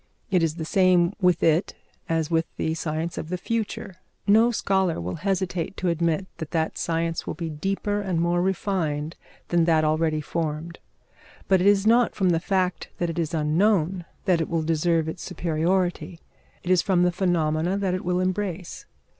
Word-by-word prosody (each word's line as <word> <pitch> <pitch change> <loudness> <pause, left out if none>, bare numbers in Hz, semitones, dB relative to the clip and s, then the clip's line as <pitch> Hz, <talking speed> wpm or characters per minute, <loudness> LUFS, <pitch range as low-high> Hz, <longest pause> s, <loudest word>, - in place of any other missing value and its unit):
It 180 -2 +3
is 160 -1 0
the 160 -2 -5
same 185 0 +3
with 180 -3 +3
it 165 +4 +2 0.3
as 165 -1 0
with 165 0 +1
the 160 - -1
science 160 +1 -3
of 160 - -6
the 180 - -2
future. 205 -2 -3 0.3
No 220 +3 +5
scholar 190 -6 0
will 90 +2 -4
hesitate 185 -1 -2
to 185 - 0
admit 170 +2 0
that 160 - -5
that 160 -2 -1
science 165 0 -1
will - - -3
be 165 -1 -4
deeper 195 +6 -2
and 185 -4 -1
more 175 +1 +1
refined 170 -5 -1 0.3
than 170 -1 +3
that 160 -2 +3
already 155 0 +1
formed. 160 +1 -4 0.7
But 190 -2 +4
it 190 - +3
is 200 0 +4
not 235 +2 +4
from 190 -3 +2
the 165 - +2
fact 185 0 -1
that 175 -1 -1
it 170 - -4
is 165 0 -1
unknown 175 +3 +1 0.2
that 180 -4 +3
it 160 - -2
will 165 -1 0
deserve 165 0 +1
its 160 +2 -5
superiority: 175 +1 -1 0.4
it 180 - -1
is 180 -2 +5
from 180 -1 +2
the 180 - +3
phenomena 175 -1 0
that 195 -2 0
it 185 - -3
will 180 0 0
embrace. 185 -1 -3
175 Hz, 180 wpm, -25 LUFS, 160-190 Hz, 0.7 s, No